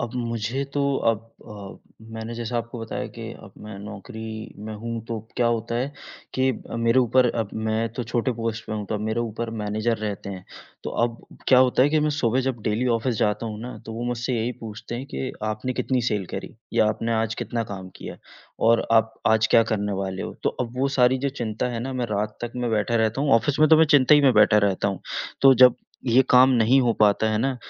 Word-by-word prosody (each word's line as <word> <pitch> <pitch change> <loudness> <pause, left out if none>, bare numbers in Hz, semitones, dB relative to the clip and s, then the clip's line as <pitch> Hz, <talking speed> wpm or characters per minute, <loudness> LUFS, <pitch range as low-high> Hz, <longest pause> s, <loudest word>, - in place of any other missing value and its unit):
अब 120 -2 -3
मुझे 115 +2 -2
तो 145 - +1 0.3
अब 110 -2 +2 0.3
अ, 105 +2 -12
मैंने 110 +1 -5
जैसा 120 +1 -3
आपको 115 +1 -6
बताया 115 - -4
कि - - -7 0.2
अब - - -14
मैं 105 -2 -8
नौकरी 110 +2 -8
में 110 - -5
हूँ, 115 +2 -5
तो 115 -1 -3 0.2
क्या 120 - +2
होता 115 0 -1
है 135 +4 -2 0.4
कि 130 0 +2 0.2
अ, - - -4
मेरे 115 +2 +3
ऊपर 125 +1 +3
अब 100 - -10 0.2
मैं 110 +1 0
तो - - 0
छोटे 120 +2 -1
पोस्ट 115 0 -3
पे - - -5
हूँ, 105 -2 -4
तो - - -3
अब 105 - -2
मेरे 110 +2 -1
ऊपर 115 0 -4
मैनेजर 110 +2 -1
रहते 100 -2 -4
हैं। 95 -1 -8 0.4
तो - - -3
अब 115 -1 -4 0.3
क्या 130 - +7
होता 130 0 +4
है 140 - +4
कि 155 - +3
मैं 150 0 +1
सुबह 120 +3 +2
जब 120 -3 -3
डेली 110 +4 0
ऑफ़िस 115 +1 -1
जाता 105 +2 0
हूँ 105 -1 -6
ना, 125 +2 -7
तो 110 - -6
वो 115 +2 -4
मुझसे 120 +1 -2
यही 115 +2 -1
पूछते 110 +1 -7
हैं 130 +3 -5
कि 130 - -3 0.2
आपने 125 +5 -4
कितनी 130 0 0
सेल 100 -4 -1
करी - - -6 0.2
या 110 - +3
आपने 115 +2 -2
आज 110 0 0
कितना 115 -1 -3
काम 95 -1 -7
किया - - -8 0.5
और 115 - +3
आप 110 0 +3
आज 110 0 +4
क्या 115 - +6
करने 105 -1 -1
वाले 95 -1 -4
हो? - - -6
तो - - +2
अब 125 0 -4
वो 140 - +2
सारी 125 +1 +4
जो 140 - -1
चिंता 110 +1 -2
है 115 -1 -4
ना, 130 +2 -4
मैं 125 -2 -2
रात 105 +1 -2
तक 120 - -6
मैं 120 -2 -1
बैठा 110 +2 0
रहता 110 +3 +1
हूँ 145 -1 +1
ऑफ़िस 145 +5 -1
में 155 - +6
तो 160 - +7
मैं 160 - +7
चिंता 140 +2 +5
ही 145 - +6
में 135 -2 +5
बैठा 105 0 +6
रहता 95 +1 -1
हूँ। 95 -2 -4 0.4
तो 135 -1 +8
जब 125 - +6 0.3
ये 125 +2 +5
काम 130 +1 +7
नहीं 125 +2 +4
हो 120 -2 +2
पाता 105 +1 +4
है 110 - 0
ना, 130 +3 0
115 Hz, 235 wpm, -24 LUFS, 110-125 Hz, 0.5 s, तो